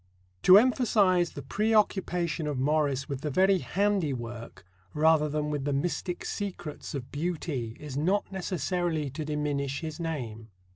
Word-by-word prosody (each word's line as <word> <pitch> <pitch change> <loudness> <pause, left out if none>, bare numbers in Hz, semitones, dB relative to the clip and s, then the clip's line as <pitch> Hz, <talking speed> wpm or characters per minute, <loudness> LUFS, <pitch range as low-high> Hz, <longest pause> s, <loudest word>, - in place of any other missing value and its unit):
To 185 +1 +9
emphasize 205 -7 +3
the - - -7
preoccupation 190 -7 +1
of 145 -3 -2
Morris 140 -1 +1
with 140 -2 -4
the 150 - -2
very 190 +6 +3
handiwork, 125 - -2 0.3
rather 155 0 +4
than 150 0 -1
with 145 -2 -2
the 145 0 -1
mystic 175 +4 -2
secrets, 180 -8 -5
of 130 -3 -6
beauty 145 -7 -3
is 145 -3 -6
not 185 +9 +1
necessarily 175 -5 -2
to 155 +4 -4
diminish 145 -2 -2
his 160 -1 -6
name. 120 -10 -4
155 Hz, 140 wpm, -28 LUFS, 140-180 Hz, 0.3 s, To